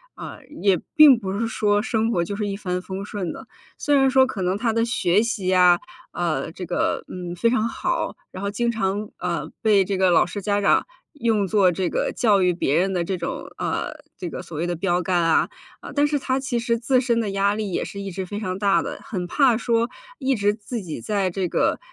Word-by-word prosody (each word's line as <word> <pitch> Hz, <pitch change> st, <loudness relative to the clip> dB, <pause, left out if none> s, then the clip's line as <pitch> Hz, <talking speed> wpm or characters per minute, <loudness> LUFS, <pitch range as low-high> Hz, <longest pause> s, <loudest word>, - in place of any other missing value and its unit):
啊， -, -, -8 dB, 0.2 s
也 195 Hz, -4 st, +3 dB, 0.2 s
并 300 Hz, -6 st, +9 dB
不 195 Hz, -2 st, -3 dB
是 230 Hz, -, 0 dB
说 205 Hz, -2 st, +1 dB
生 225 Hz, 0 st, 0 dB
活 170 Hz, -5 st, +1 dB
就 200 Hz, -, -4 dB
是 210 Hz, 0 st, -2 dB
一 200 Hz, -, -3 dB
帆 180 Hz, -2 st, -3 dB
风 190 Hz, +1 st, -6 dB
顺 195 Hz, -5 st, -4 dB
的。 -, -, -11 dB, 0.3 s
虽 290 Hz, -, +1 dB
然 270 Hz, -1 st, +4 dB
说 265 Hz, 0 st, +5 dB
可 210 Hz, -7 st, -5 dB
能 185 Hz, +1 st, 0 dB
他 230 Hz, +2 st, 0 dB
的 230 Hz, -, +2 dB
学 200 Hz, -4 st, +2 dB
习 220 Hz, -5 st, -2 dB
呀， 180 Hz, -1 st, +5 dB, 0.3 s
啊， 170 Hz, -2 st, -2 dB
这 180 Hz, +2 st, -7 dB
个， 175 Hz, -, -1 dB
嗯， 175 Hz, -1 st, -6 dB
非 230 Hz, +7 st, +2 dB
常 230 Hz, -2 st, +1 dB
好， -, -, -2 dB, 0.2 s
然 185 Hz, -, -8 dB
后 200 Hz, -, -1 dB
经 235 Hz, +3 st, 0 dB
常， 205 Hz, -1 st, -2 dB
呃， 175 Hz, -1 st, -3 dB
被 210 Hz, -3 st, +4 dB
这 195 Hz, 0 st, -2 dB
个 190 Hz, 0 st, +3 dB
老 170 Hz, -, +5 dB
师 205 Hz, -, -6 dB
家 205 Hz, +1 st, 0 dB
长 200 Hz, -, +3 dB, 0.3 s
用 230 Hz, -8 st, +1 dB
作 190 Hz, -2 st, +4 dB
这 180 Hz, 0 st, -1 dB
个 -, -, -1 dB
教 210 Hz, -5 st, +3 dB
育 180 Hz, -1 st, +3 dB
别 150 Hz, -4 st, 0 dB
人 190 Hz, +2 st, +1 dB
的 175 Hz, -, 0 dB
这 185 Hz, +1 st, -2 dB
种， -, -, -5 dB
啊， -, -, -2 dB, 0.3 s
这 175 Hz, -, -5 dB
个 -, -, -6 dB
所 160 Hz, -, -9 dB
谓 165 Hz, -, -1 dB
的 175 Hz, 0 st, -2 dB
标 175 Hz, 0 st, +1 dB
杆 180 Hz, 0 st, +1 dB
啊， 165 Hz, -, +3 dB, 0.3 s
呃， -, -, -9 dB
但 290 Hz, +1 st, +3 dB
是 290 Hz, 0 st, 0 dB
他 260 Hz, 0 st, -1 dB
其 260 Hz, -2 st, -2 dB
实 235 Hz, 0 st, 0 dB
自 255 Hz, +1 st, +2 dB
身 235 Hz, -2 st, +1 dB
的 210 Hz, -3 st, -1 dB
压 200 Hz, +1 st, +2 dB
力 210 Hz, -2 st, -3 dB
也 -, -, 0 dB
是 200 Hz, -, -7 dB
一 195 Hz, -1 st, -5 dB
直 190 Hz, +1 st, -4 dB
非 205 Hz, +3 st, -5 dB
常 185 Hz, -3 st, -3 dB
大 200 Hz, -1 st, +3 dB
的。 -, -, -6 dB
很 195 Hz, -10 st, -4 dB
怕 260 Hz, +1 st, +3 dB
说 230 Hz, 0 st, +1 dB, 0.3 s
一 270 Hz, -1 st, +1 dB
直 205 Hz, -1 st, +2 dB
自 220 Hz, +2 st, -6 dB
己 165 Hz, -4 st, -6 dB
在 200 Hz, -3 st, 0 dB
这 185 Hz, 0 st, -2 dB
个， -, -, +1 dB
200 Hz, 255 characters per minute, -23 LUFS, 185-230 Hz, 0.3 s, 并